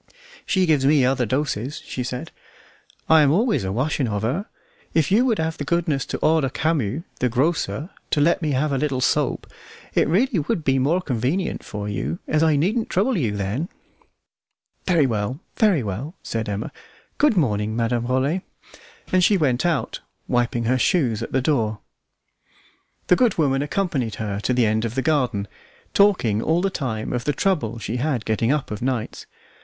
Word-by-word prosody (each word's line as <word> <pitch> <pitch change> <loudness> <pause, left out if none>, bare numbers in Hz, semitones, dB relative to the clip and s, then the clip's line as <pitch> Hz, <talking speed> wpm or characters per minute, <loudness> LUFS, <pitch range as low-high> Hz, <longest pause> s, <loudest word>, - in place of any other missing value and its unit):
"She 190 -1 +2
gives 155 -5 +2
me 140 -1 +4
other 130 -2 +1
doses," 130 0 -2
she 125 - -4
said: 125 0 -5 0.8
"I 160 -1 +6
am 145 - +4
always 195 - +2
a 95 - -2
washing 130 +4 0
of 105 -1 -2
her. 150 - -1 0.5
If 160 +2 +2
you 230 +6 +4
would 230 -4 +2
have 160 0 -2
the - - -2
goodness 160 -3 0
to - - -3
order 155 -4 +3
Camus, 150 -2 -1 0.2
the 125 - +1
grocer, 155 - -1 0.2
to - - +1
let 170 +5 +3
me 155 -3 0
have 145 +3 +1
a 135 - 0
little 140 -3 0
soap, - - +1 0.5
it - - +2
would 200 +11 +3
really 175 +4 +1
be 135 -3 +2
more 160 +8 +2
convenient 135 - -1
for 105 -1 -5
you, 85 -6 -3
as 155 - +1
I 160 -2 +4
needn't 210 - 0
trouble 215 +8 +1
you 115 - -1
then." 105 - -2 1.2
"Very 170 -6 +4
well! 115 +2 -2 0.2
very 200 - +3
well!" 115 - -5
said 115 -1 -3
Emma. 105 +2 -3 0.5
"Good 290 -8 +4
morning, 110 - +1
Madame 120 +1 0
Rollet," 135 +8 +1 0.7
and 185 0 +3
she 200 +2 +4
went 140 -1 +1
out, 165 -5 -1 0.3
wiping 120 -1 0
her 130 +3 +1
shoes 125 - +1
at - - -5
the 130 - +1
door. 115 -8 +1 1.3
The 180 - +5
good 235 0 +2
woman 135 -4 +2
accompanied 145 - -1
her 105 -2 -3
to 110 - -1
the 125 -2 +3
end 110 +1 +1
of 115 0 -3
the 135 - 0
garden, 125 -10 0 0.5
talking 180 - +3
all 165 +6 +1
the 195 - +1
time 115 -10 -3
of 125 -1 -2
the 145 - +1
trouble 145 - 0
she 115 +2 -4
had 130 -3 -1
getting 115 +2 +1
up 145 -5 -1
of 105 - -5
nights. 125 -3 -3
135 Hz, 180 wpm, -22 LUFS, 115-165 Hz, 1.3 s, I